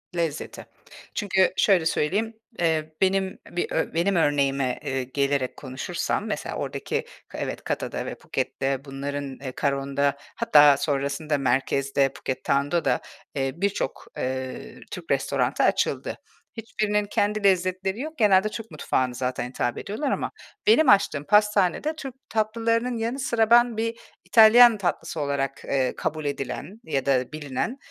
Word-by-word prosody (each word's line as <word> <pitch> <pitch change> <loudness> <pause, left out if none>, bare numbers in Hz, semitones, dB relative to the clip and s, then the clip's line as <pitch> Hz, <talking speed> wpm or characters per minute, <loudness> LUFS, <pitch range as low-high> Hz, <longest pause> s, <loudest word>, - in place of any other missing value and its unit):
Lezzeti. 165 -3 -3 0.5
Çünkü 190 -3 +2
şöyle 185 -5 +4
söyleyeyim, 200 +9 0 0.3
ııı, 160 -2 +1
benim 190 0 +1
bir 175 - -2
ö - - -1
benim 175 +4 +1
örneğime, 140 -5 +1
ııı, 135 -1 -1
gelerek 135 0 -1
konuşursam 130 -2 -3
mesela - - -3
oradaki - - -3 0.3
evet, - - -4
Kata´da - - -3
ve - - -4
Phuket´te 135 0 -3
bunların 140 0 -5
Karon´da 140 +1 -1 0.2
hatta 150 -11 +6
sonrasında 140 +1 -1
merkezde, 135 +1 +1
Phuket 130 0 -5
Town´da 145 +4 +1
da, - - +2 0.3
eee, 135 -1 0
birçok, 200 -5 -2
ııı, 130 0 -4
Türk - - -6
restoranı - - +1
açıldı. - - +1 0.4
Hiçbirinin 210 -2 -1
kendi 205 +1 0
lezzetleri 190 +2 +1
yok. 310 +3 -6
Genelde 210 -2 +4
Türk 225 -1 -8
mutfağına 130 -4 -1
zaten 125 0 -3
hitap 120 -1 -2
ediyorlar 265 +8 -3
ama - - -2 0.4
benim 315 - +6
açtığım 195 -8 +4
pastanede 210 - +2
Türk 270 -5 -7
tatlılarının 230 +2 0
yanı 230 +4 -2
sıra 230 -4 +1
ben 240 -1 +5
bir 230 +1 -2 0.3
İtalyan 230 +1 +8
tatlısı 175 -3 -2
olarak, 140 -2 -2
ııı, 130 -2 0
kabul 155 0 -3
edilen 145 - -4
ya 140 -4 -2
da 130 -2 +1
bilinen, 155 - -3
160 Hz, 135 wpm, -25 LUFS, 140-215 Hz, 0.5 s, İtalyan